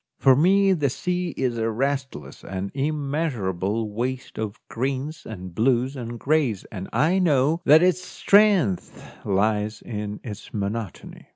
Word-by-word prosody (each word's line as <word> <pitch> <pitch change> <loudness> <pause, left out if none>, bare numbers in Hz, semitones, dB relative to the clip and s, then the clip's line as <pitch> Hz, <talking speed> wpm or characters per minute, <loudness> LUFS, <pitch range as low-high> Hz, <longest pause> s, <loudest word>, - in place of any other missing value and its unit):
For 135 -2 +5
me 195 +6 +4
the 145 -6 +1
sea 180 +6 -2
is 125 -3 -1
a 115 0 0
restless 130 - -3
and 95 +1 -5
immeasurable 135 - -1
waste 125 +3 -4
of 110 +1 -4
greens 135 +5 -3
and 95 -5 -8
blues 125 +5 +1
and 120 -2 -6
greys, 135 -9 +1
and 95 -2 -6
I 175 +5 +2
know 155 -1 +2
that 155 +4 +7
its 185 0 +3
strength 195 - +2 0.2
lies 105 +2 0
in 105 -2 -5
its 105 -2 -8
monotony. 105 -1 -5
130 Hz, 135 wpm, -24 LUFS, 105-150 Hz, 0.2 s, that